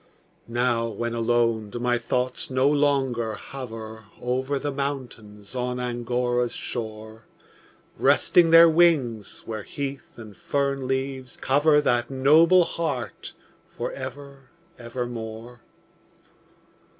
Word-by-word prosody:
Now, 120 -1 0
when 115 +2 -4
alone, 115 -2 +1
do 110 - -6
my 120 0 0
thoughts 125 +1 -2
no 130 +1 +2
longer 135 -6 +1
hover 110 -1 -8
Over 130 +3 -1
the 145 +1 -3
mountains 125 -7 -6
on 125 0 -2
Angora's 120 0 -1
shore, 110 -1 -6 0.7
Resting 175 -2 +4
their 165 +1 +9
wings, 155 -10 +2
where 110 -1 -5
heath 140 +5 -6
and 110 -3 -11
fern 140 +1 -1
leaves 130 -1 -3
cover 150 +3 +3
That 120 -4 +1
noble 155 +7 +5
heart 160 -8 -4 0.3
for - - -5
ever, 135 0 -9 0.3
ever 120 +1 -4
more? 115 0 -8
125 Hz, 110 wpm, -25 LUFS, 115-140 Hz, 0.7 s, their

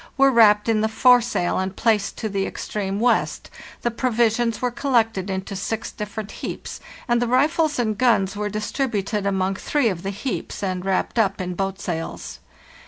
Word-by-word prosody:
were 275 0 +5
wrapped 210 -3 +5
in 220 -2 +2
the 220 - +1
foresail 240 -6 +3
and 190 +1 -3
placed 215 -4 +1
to 220 - -3
the 195 -2 -1
extreme 200 -1 -4
west, 240 +1 +1 0.3
the 240 - +1
provisions 235 -1 +1
were 250 -1 0
col 275 +2 -3
lected 220 -5 +2
into 190 +1 -4
six 225 +4 -3
different 210 0 -6
heaps, - - -6 0.3
and 240 -1 +2
the 245 - +1
rifles 295 +5 +2
and 220 -4 -1
guns 210 -6 +3
were 210 0 -2
distributed 210 -2 -2
among 190 -1 0
three 245 +5 0
of 180 -4 -4
the 195 - -3
heaps 205 +2 -4
and 185 -1 -2
wrapped 195 +4 0
up 200 -3 +1
in 180 -1 -3
boat 195 +1 -3
sails. 165 -4 -5
215 Hz, 175 wpm, -22 LUFS, 195-240 Hz, 0.3 s, were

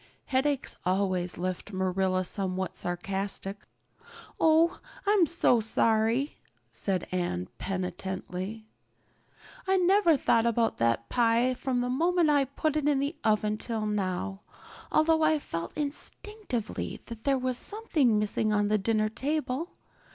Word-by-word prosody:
Headaches 270 +1 0
always 185 -1 0
left 185 +3 -4
Marilla 185 0 0
somewhat 190 -1 -2
sarcastic. 195 +2 -4 0.7
"Oh, 325 +1 +4 0.3
I'm 400 -4 +4
so 290 -8 +3
sorry," 225 +4 +1 0.3
said 190 -3 -2
Anne 175 - -2
penitently. 190 +2 -4 1.0
"I 385 0 +3
never 365 -3 +4
thought 230 -2 +3
about 230 0 +1
that 115 0 +1
pie 240 +1 +3
from 255 -1 -1
the 245 - -1
moment 335 +3 +3
I 285 -2 +3
put 290 +3 -2
it 295 -1 +2
in 290 - +3
the 280 +4 -1
oven 215 -1 +1
till 225 -2 -2
now, 195 -1 -2 0.5
although 320 +1 +3
I 310 0 +4
felt 170 - -6
instinctively 300 - -3
that 230 -1 -9
there 275 -1 +2
was 255 -1 -1
something 310 - +1
missing 210 +1 0
on 205 -1 +2
the 215 0 +2
dinner 215 +1 +1
table. 285 +6 -2
225 Hz, 130 wpm, -28 LUFS, 195-290 Hz, 1.0 s, Oh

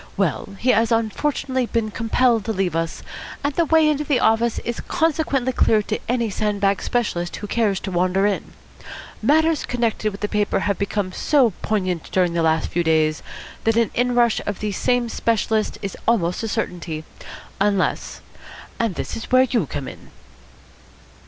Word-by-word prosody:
Well, 200 - -1
he 255 +5 +2
has 230 +1 +2
unfortunately 255 +3 0
been 225 -2 -1
compelled 230 +1 +2
to - - -1
leave 190 -4 -1
us, 165 0 -2 0.4
and 285 0 0
the 335 +3 +2
way 320 0 +4
into 300 -1 +1
the 285 -4 +1
office 225 0 +2
is 235 0 -3
consequently 315 -6 0
clear 215 -3 +3
to 215 - -3
any 235 -3 0
sand 210 0 -1
bag 195 -1 +1
specialist 175 -8 -1
who - - -6
cares 205 -3 0
to 190 - -5
wander 185 +2 +2
in. 205 -1 -2 0.7
Matters 315 +1 +3
connected 230 -3 -1
with 200 - -10
the 210 - 0
paper 210 -1 0
have 200 -1 -1
become 200 -1 -1
so 260 +3 +3
poignant 185 -5 -1
during 180 -2 +2
the 170 - +1
last 160 0 +1
few 175 - 0
days 155 -1 +2 0.4
that 225 0 +2
an 230 -1 +2
inrush 245 -2 +2
of 205 -2 -3
these 210 -3 -3
same 245 -1 +1
specialists 220 -1 0
is 195 - -4
almost 180 -7 +1
a 225 - -2
certainty, 170 -6 -3 0.6
unless 200 -1 0 0.6
and 225 -6 0
this - - -4
is 225 - -7
where 255 0 +6
you 235 - 0
come 140 -1 -5
in." - - -11
220 Hz, 170 wpm, -22 LUFS, 190-245 Hz, 0.7 s, where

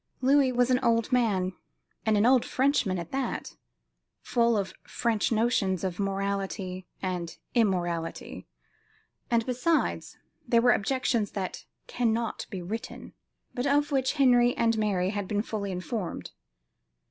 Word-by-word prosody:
Louis 270 0 +4
was 245 0 +2
an 250 - +4
old 230 +1 +2
man, 200 -7 +1 0.5
and 215 -1 +4
an 205 - +3
old 255 -1 +5
Frenchman 255 -8 +1
at 170 -1 -6
that; 265 -2 -3 0.7
full 235 -2 +2
of 195 -2 -2
French 230 -3 -1
notions 215 -5 +1
of 185 -1 -3
morality 195 -2 -2 0.2
and 180 -3 -3 0.2
immorality; 175 -7 -1 0.8
and 230 -1 +2
besides, 255 +6 0 0.3
there 235 - +4
were 245 +1 +5
objections 235 -2 +1
that 190 -3 -4 0.2
cannot 230 -1 -1
be 185 -3 -5
written, 225 +7 -6 0.4
but 245 +3 -1
of 290 +1 +2
which 265 -2 +1
Henry 245 -4 +4
and 230 -1 +2
Mary 200 -4 0
had 205 -2 -3
been 205 +1 0
fully 205 -3 -4
informed. 185 +1 -4
225 Hz, 135 wpm, -28 LUFS, 190-245 Hz, 0.8 s, old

